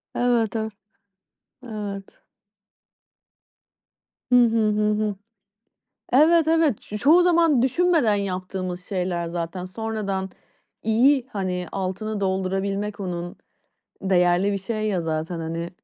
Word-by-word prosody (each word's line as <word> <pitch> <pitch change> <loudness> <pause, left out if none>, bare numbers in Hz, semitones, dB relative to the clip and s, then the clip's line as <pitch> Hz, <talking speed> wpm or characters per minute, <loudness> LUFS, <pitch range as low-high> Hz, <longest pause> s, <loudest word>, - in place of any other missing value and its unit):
Evet, 240 -3 +1
e. 220 0 -1 0.9
Evet. 205 -4 -7 2.1
Hı - - +6
hı, 235 -2 +5
hı 210 0 +1
hı. 210 -1 -1 1.0
Evet, 315 +4 +5
evet. 320 -8 +2
Ç - - -10
çoğu 315 - +5
zaman 335 -7 +4
düşünmeden 310 -4 +3
yaptığımız 185 -2 -4
şeyler 180 -3 -2
zaten. 170 +1 -4
Sonradan, 195 -1 -3 0.5
iyi, 245 +4 +3
hani, 185 -3 -2
altını 200 +3 -3
doldurabilmek 195 +2 -2
onun, 175 -2 -5 0.7
değerli 180 +1 +3
bir 200 - -1
şey 215 +2 -3
ya 190 -4 0
zaten, 160 +1 -3
hani. 165 +1 -4
200 Hz, 105 wpm, -23 LUFS, 185-230 Hz, 2.1 s, Hı